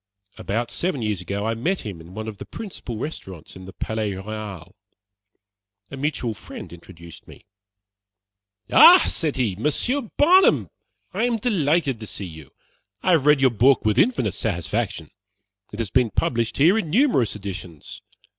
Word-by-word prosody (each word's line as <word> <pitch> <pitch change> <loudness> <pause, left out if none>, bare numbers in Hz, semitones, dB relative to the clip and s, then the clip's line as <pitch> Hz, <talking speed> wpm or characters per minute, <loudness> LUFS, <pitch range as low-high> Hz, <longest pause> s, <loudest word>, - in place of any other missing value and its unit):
About 115 +4 -2
seven 145 -4 -2
years 105 -4 -2
ago, 100 +4 -4
I 115 - 0
met 170 +12 -1
him 95 -7 -7
in 85 +3 -14
one 110 0 -5
of 105 -2 -7
the - - -7
principal 180 - -7
restaurants 95 - -8
in 95 0 -11
the 95 - -9
Palais 110 -2 -3
Royale. 100 -3 -7 1.2
A - - -6
mutual 135 -5 -2
friend 100 - -10
introduced 85 -1 -13
me. - - -15 1.3
"Ah!" 360 +1 +9
said 155 -4 -2
he, 115 -8 -1
"Monsieur 155 - 0 0.2
Barnum, 365 +6 +4 0.4
I - - 0
am 240 -2 0
delighted 160 - 0
to 110 - -8
see 100 - -6
you. 80 -5 -11 0.5
I 185 - +2
have 155 -5 +3
read 150 -2 +5
your 130 -2 +4
book 125 +4 +3
with 110 +2 +2
infinite 125 - +2
satisfaction. 100 -3 -3 0.6
It 105 - -8
has 110 -4 -3
been 125 -3 +3
published 115 +2 -1
here 175 +10 +4
in 165 - -4
numerous 205 - +2
editions. 95 -6 -8
115 Hz, 160 wpm, -23 LUFS, 100-150 Hz, 1.3 s, Ah